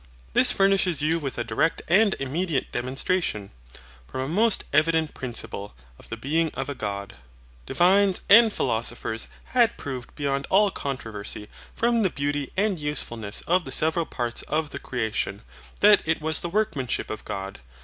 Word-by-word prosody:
This - - +6
furnishes 195 -5 +2
you 165 +2 +2
with 140 -4 -5
a 120 - -1
direct 160 +6 0
and 200 +4 +4
immediate 145 +2 -1
demonstration, 130 - -1 0.6
from 130 - -5
a 130 - -3
most 210 +7 +3
evident 160 +1 +2
principle, 115 - -6 0.2
of - - -15
the 115 - -5
BEING 155 +7 +1
OF 135 +1 -3
A - - -2
GOD. 100 - -5 0.5
Divines 190 +2 +3
and 225 +2 +8
philosophers 115 - -2 0.3
had 240 -3 +3
proved 130 -3 -7
beyond 140 -2 -2
all 200 +1 +4
controversy, 110 - -5 0.3
from 235 0 +2
the 195 - +2
beauty 145 -1 -2
and 200 -3 +1
usefulness 115 -8 -2
of 180 +1 +1
the 135 - -8
several 160 +4 +2
parts 120 -1 -2
of 155 -1 -1
the 140 - -6
creation, 110 -6 -3 0.4
that 210 -1 +7
it 160 +1 0
was 160 +1 +1
the 170 - -4
workmanship 170 - -1
of 110 - -6
God. 95 0 -6
145 Hz, 160 wpm, -25 LUFS, 120-185 Hz, 0.6 s, and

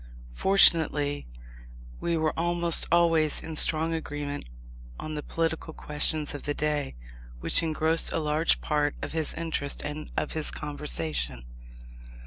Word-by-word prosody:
Fortunately 150 - +3 0.7
we 170 -1 -1
were 155 -1 0
almost 170 0 +4
always 165 -3 +3
in 160 - -7
strong 160 +1 +4
agreement 145 -3 -5 0.5
on 155 - -6
the 150 - -4
political 160 0 -3
questions 150 0 0
of 145 - -7
the 145 - -4
day, 150 - -2 0.4
which - - +3
engrossed 160 0 +2
a - - -1
large 155 +1 0
part 150 -1 -1
of 145 - -5
his 160 -2 -2
interest 160 -4 -3
and 150 +1 -6
of - - -2
his 155 -1 +1
conversation. 80 - -2
155 Hz, 130 wpm, -26 LUFS, 145-165 Hz, 0.7 s, almost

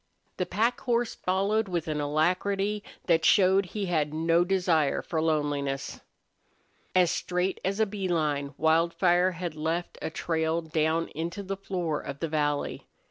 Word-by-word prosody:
The 180 - -1
pack 230 +4 +1
horse 240 -1 0
followed 200 +4 0
with 175 -3 -2
an 150 -1 -1
alacrity 195 +7 0 0.2
that 165 -2 +3
showed 190 +1 +4
he 205 +2 -3
had 155 -4 0
no 165 +2 +3
desire 175 -6 +1
for 160 -2 -2
loneliness. 145 -3 -1 1.0
As 180 -2 +5
straight 180 +1 -1
as 195 +2 -1
a 220 - +4
bee 195 -2 -4
line 150 -4 -1
Wildfire 170 +3 +3
had 175 -1 -4
left 160 +3 -3
a - - -2
trail 160 0 -1
down 160 +1 0
into 170 +6 -4
the 195 +1 -3
floor 180 -5 -3
of 140 - -6
the 165 - -1
valley. 145 -2 -1
170 Hz, 150 wpm, -28 LUFS, 155-190 Hz, 1.0 s, As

